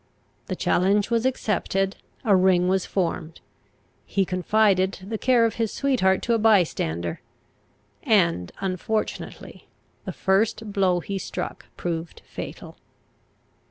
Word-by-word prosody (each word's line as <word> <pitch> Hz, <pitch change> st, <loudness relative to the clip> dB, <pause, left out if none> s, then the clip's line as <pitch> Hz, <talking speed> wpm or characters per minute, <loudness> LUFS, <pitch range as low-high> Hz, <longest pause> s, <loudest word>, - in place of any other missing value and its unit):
The -, -, -3 dB
challenge 200 Hz, +4 st, +2 dB
was 235 Hz, +2 st, +2 dB
accepted; 195 Hz, -5 st, -1 dB, 0.3 s
a 205 Hz, -3 st, +5 dB
ring 180 Hz, -1 st, +4 dB
was 190 Hz, 0 st, +1 dB
formed; 170 Hz, -3 st, -2 dB, 0.6 s
he 195 Hz, -1 st, 0 dB
confided 190 Hz, +1 st, +2 dB
the 220 Hz, 0 st, -3 dB
care 245 Hz, -2 st, +4 dB
of 225 Hz, -, -2 dB
his 225 Hz, -, 0 dB
sweetheart 235 Hz, -9 st, +1 dB
to 235 Hz, -, +1 dB
a 230 Hz, -, +2 dB
bystander; 155 Hz, -, +1 dB, 0.8 s
and 170 Hz, -, +2 dB
unfortunately 195 Hz, +3 st, -4 dB, 0.4 s
the -, -, -3 dB
first 205 Hz, +2 st, 0 dB
blow 185 Hz, -3 st, +2 dB
he 195 Hz, +2 st, -4 dB
struck -, -, -5 dB
proved 165 Hz, -1 st, -4 dB
fatal. -, -, -8 dB
195 Hz, 120 wpm, -24 LUFS, 180-220 Hz, 0.8 s, a